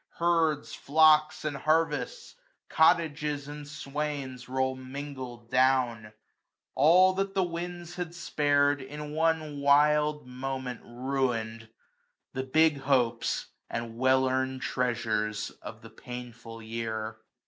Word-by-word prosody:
Herds, 165 -3 +1
flocks, 155 +1 +4
and 150 -2 -1
harvests, 160 - 0 0.4
cottages, 150 -3 +2
and 145 0 -8
swains, 140 -3 -4
340 - - -15
Roll 130 0 0
mingled 130 -3 -8
down; 125 -4 +2 0.6
all 180 +6 +6
that 195 +1 -2
the 190 - +3
winds 175 0 -5
had 175 -1 -5
spar'd 145 -3 +2
In 150 +2 -7
one 155 -2 0
wild 150 +1 +3
moment 130 -1 -5
ruin*d; 120 -3 -2 0.7
the 130 - -2
big 155 +2 +3
hopes. 125 -4 0 0.2
And 115 -1 -4
well 130 +2 +3
earn'd 130 0 -1
treasures 110 -4 -1
of - - -9
the - - -12
painfiil 120 -2 -9
year. 110 -1 -4
140 Hz, 115 wpm, -28 LUFS, 125-155 Hz, 0.7 s, all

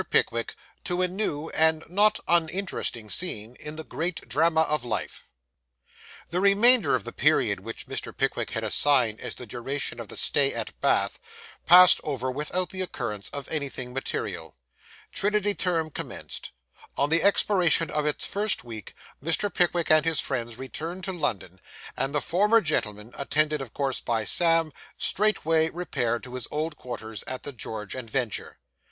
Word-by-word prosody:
PICKWICK - - +1 0.3
TO 180 0 -1
A - - +3
NEW 175 -5 -2
AND 160 0 +3
NOT 210 +4 +3
UNINTERESTING 170 - 0
SCENE 120 - -2
IN 150 0 -4
THE 160 - -6
GREAT 165 +2 -4
DRAMA 160 +2 +3
OF 150 -4 +1
LIFE 120 - -4 1.0
The 175 - 0
remainder 200 - +6
of 120 - -2
the - - -6
period 100 -2 +2
which 115 +4 -8
Mr. - - -5
Pickwick - - -1
had - - -3
assigned 125 -7 +3
as - - -5
the 125 - -9
duration 125 +5 -4
of - - -6
the - - -7
stay - - +2
at - - -3
Bath - - +1 0.5
passed 180 +1 +9
over 130 -3 -2
without 150 +7 -2
the 185 - -3
occurrence 115 - -4
of 140 -1 -6
anything 135 -5 -3
material. 85 - -4 0.5
Trinity 205 0 0
term 165 -4 -1
commenced. - - -6 0.5
On 145 +2 +1
the 165 - +4
expiration 180 -5 +3
of 150 0 0
its 150 - -2
first 210 +1 -1
week, 110 -3 -9 0.3
Mr. 165 +6 0
Pickwick 175 -2 +2
and 155 -1 +6
his 165 -2 +1
friends 120 -4 -3
returned 165 +8 -6
to 190 - -3
London; 100 - -3 0.3
and 140 +2 -2
the 145 - +2
former 210 +6 +3
gentleman, 110 - -2
attended 150 +1 +1
of 130 -5 -7
course 135 -2 -1
by 115 -2 -1
Sam, 165 - +3 0.2
straightway 165 -6 +2
repaired 125 -10 -2
to 125 - -10
his 125 -2 -4
old 155 +1 -3
quarters 110 -3 -7
at 130 - -5
the 145 - -5
George 105 -3 -6
and 125 -3 -7
Vulture. 120 -2 -3
150 Hz, 160 wpm, -26 LUFS, 125-175 Hz, 1.0 s, passed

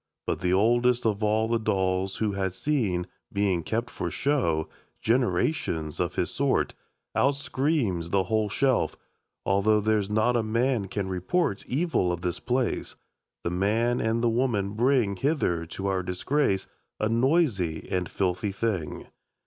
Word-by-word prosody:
But - - -1
the 90 -1 0
oldest 120 +5 +3
of 105 -1 +1
all 110 +1 +2
the 115 0 +1
dolls 95 -2 0
Who 110 -2 0
had 95 -2 -2
seen, 100 -7 0 0.3
being 100 -4 +1
kept 115 +8 -2
for - - -3
show, 120 - 0 0.3
Generations 95 - 0
of - - -1
his - - 0
sort, - - +1 0.4
Out 140 +1 +3
screams 130 - -1
the 95 +1 +2
whole 110 +2 0
shelf: 130 +4 +1 0.5
'Although 100 +2 +3
There's 105 -1 +1
not 110 +3 +2
a 120 - +3
man 115 0 0
can 100 0 -3
report 100 - 0
Evil 140 - +1
of 85 -1 -3
this 90 0 -2
place, 125 -1 -1 0.5
The 85 - -1
man 110 +7 +1
and 115 +1 0
the - - +4
woman 115 -5 0
bring 115 -3 +2
Hither 90 - 0
to 95 +3 -6
our 95 -1 +1
disgrace, 95 +4 0 0.3
A 110 - +1
noisy 115 - +1
and 90 -2 -1
filthy 95 +1 -1
thing.' 95 -7 -2
105 Hz, 150 wpm, -27 LUFS, 95-120 Hz, 0.5 s, the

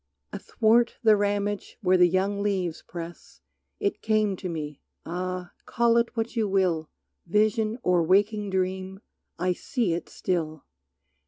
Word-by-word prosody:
Athwart 230 +1 +2
the 220 -2 +7
ramage 205 0 -1
where 185 0 +4
the 180 -1 +6
young 195 +3 0
leaves 185 -5 -1
press 170 0 -9 0.4
It 400 -2 -1
came 215 -2 +2
to 185 - -5
me, 150 -3 -5 0.2
ah, 180 +1 -4 0.2
call 235 0 +3
it 235 0 0
what 225 +2 -2
you 225 -2 +1
will 180 -5 +1 0.4
Vision 215 +3 +2
or 180 -1 +3
waking 205 +4 +2
dream, 190 +1 -2 0.4
I 180 +2 +1
see 225 -1 -1
it 170 - -4
still! 155 -4 -3
190 Hz, 140 wpm, -26 LUFS, 180-215 Hz, 0.4 s, the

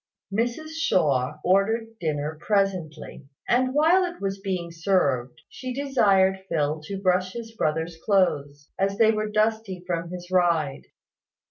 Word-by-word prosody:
Mrs 240 +8 -1
Shaw 150 - +1
ordered 220 +5 +1
dinner 150 -1 -2
presently; 185 -9 -2 0.2
and 255 +1 +2
while 330 +5 +5
it 350 -1 -4
was 195 0 -3
being 185 -4 -3
served, 155 -8 0
she 255 -1 -7
desired 200 -9 +3
Phil 150 -1 0
to 195 +3 -5
brush 185 -1 +1
his 230 -1 -7
brother's 160 -1 -1
clothes, 145 -8 0
as 195 +1 0
they 220 -1 +5
were 215 -1 -2
dusty 215 -3 0
from 170 -1 -3
his 180 0 -8
ride. 170 -6 +1
190 Hz, 135 wpm, -25 LUFS, 160-220 Hz, 0.2 s, while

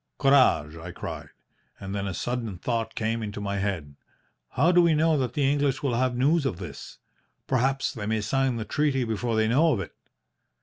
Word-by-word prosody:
"'Courage!' 130 - +4
I 85 +2 -8
cried; - - -7 0.5
and 95 0 -6
then 100 -1 -2
a 95 - -3
sudden 120 -4 -3
thought 115 +3 -2
coming 115 +1 -1
into 105 -1 -5
my 100 -1 -3
head 85 -8 -3 0.6
'How 160 +7 +3
do 175 0 +6
we 170 -2 +4
know 160 +1 +3
that 130 -3 -2
the 145 - 0
English 140 -1 +1
will 135 -4 0
have 125 +1 +1
news 145 +5 +3
of 135 -11 -2
this? 85 -7 -9 0.5
Perhaps 135 +1 0
they 105 -6 -5
may 110 0 0
sign 135 +4 0
the 110 -2 -4
treaty 140 +2 0
before 115 0 -2
they 110 0 +2
know 150 +8 +4
of 110 - -1
it.' 95 - -6
120 Hz, 200 wpm, -26 LUFS, 100-135 Hz, 0.6 s, do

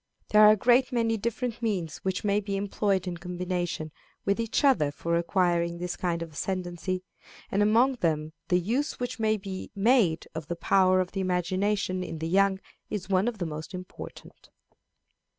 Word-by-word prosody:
There 210 - +6
are 210 - +10
a 215 - +7
great 245 +5 +4
many 230 -2 +1
different 235 +2 -3
means 190 -8 -1
which 190 -1 -3
may 205 0 +2
be 200 -1 -3
employed 200 -1 0
in 175 -2 -4
combination 175 -2 -3 0.3
with 200 +2 +1
each 230 +5 0
other 250 - +4
for 170 +3 -2
acquiring 170 -1 +1
this 175 0 -3
kind 170 -2 -1
of 165 - -9
ascendency, 185 +2 -3 0.5
and 200 - +2
among 235 +5 +4
them 155 -4 -1
the 180 - +3
use 245 - -1
which 245 -1 -4
may 220 0 +2
be 190 -2 -6
made 200 -6 +3
of 160 -2 -6
the 175 - -3
power 185 +1 +3
of 180 - -4
the 195 - -2
imagination 185 +1 0
in 165 - -5
the 160 +1 -3
young 195 +2 +3 0.3
is 200 -2 -4
one 190 +3 +2
of 240 -3 -2
the 180 - -2
most 155 +3 -6
important. 185 0 -10
190 Hz, 180 wpm, -28 LUFS, 175-210 Hz, 0.5 s, are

